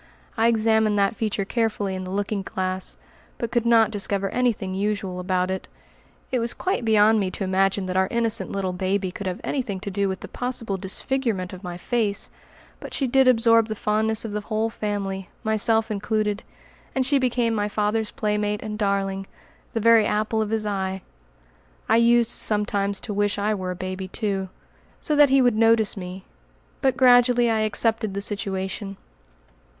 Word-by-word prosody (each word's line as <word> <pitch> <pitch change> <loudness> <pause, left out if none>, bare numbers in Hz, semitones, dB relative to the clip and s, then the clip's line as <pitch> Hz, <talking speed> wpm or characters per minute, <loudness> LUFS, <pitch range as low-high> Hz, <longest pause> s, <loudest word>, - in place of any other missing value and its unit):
I 225 -1 +3
examined 220 -2 +2
that 200 +2 +2
feature 210 -3 -2
carefully 210 -3 -1
in 185 0 -5
the - - -7
looking 200 +1 -2
glass, 185 0 -3 0.4
but 235 - -4
could 235 -1 +1
not 225 -1 +5
discover 200 -1 -1
anything 235 -6 0
usual 195 -2 -2
about 185 0 0
it. 190 - -4 0.6
It 255 - +1
was 230 0 0
quite 370 -8 -1
beyond 220 0 +4
me 195 -2 0
to 195 - -4
imagine 195 +1 +1
that 185 0 -4
our 190 0 +3
innocent 230 -2 0
little 190 -2 -2
baby 190 +1 -1
could 195 +1 -6
have 180 0 -3
anything 225 -9 -2
to 200 - -5
do 200 0 0
with 190 0 -4
the - - -7
possible 240 -5 -3
disfigurement 195 0 -2
of 185 +1 -10
my 175 -1 -6
face, 210 +1 -1 0.5
but - - -7
she 275 - +1
did 265 +1 +3
absorb 230 -2 +5
the 215 - -4
fondness 220 +2 0
of 220 - -5
the 210 0 -3
whole 220 +1 -2
family, 195 -4 -4
myself 220 0 +1
included, 210 0 -1 0.5
and 265 -1 +1
she 280 +1 +3
became 240 -2 +1
my 210 -1 -1
father's 210 +1 0
playmate 210 0 -1
and 215 -1 -5
darling, 195 -1 -1 0.5
the 225 - 0
very 225 -1 +5
apple 215 +1 0
of 215 - -2
his 220 -1 -1
eye. 190 -2 -3 0.8
I - - +4
used 235 0 +4
sometimes 205 -2 +2
to 210 - -5
wish 205 0 0
I 210 +1 0
were 185 -3 -4
a 180 - -3
baby 185 +1 -5
too, 195 -2 -2 0.5
so 305 - -1
that 290 -1 +6
he 270 0 +4
would 245 -3 +3
notice 225 -1 +4
me, 185 -1 -8 0.6
but 265 -1 +1
gradually 245 -2 +5
I 220 - +1
accepted 215 -1 0
the 200 - -2
situation. 195 0 -3
210 Hz, 180 wpm, -24 LUFS, 195-225 Hz, 0.8 s, that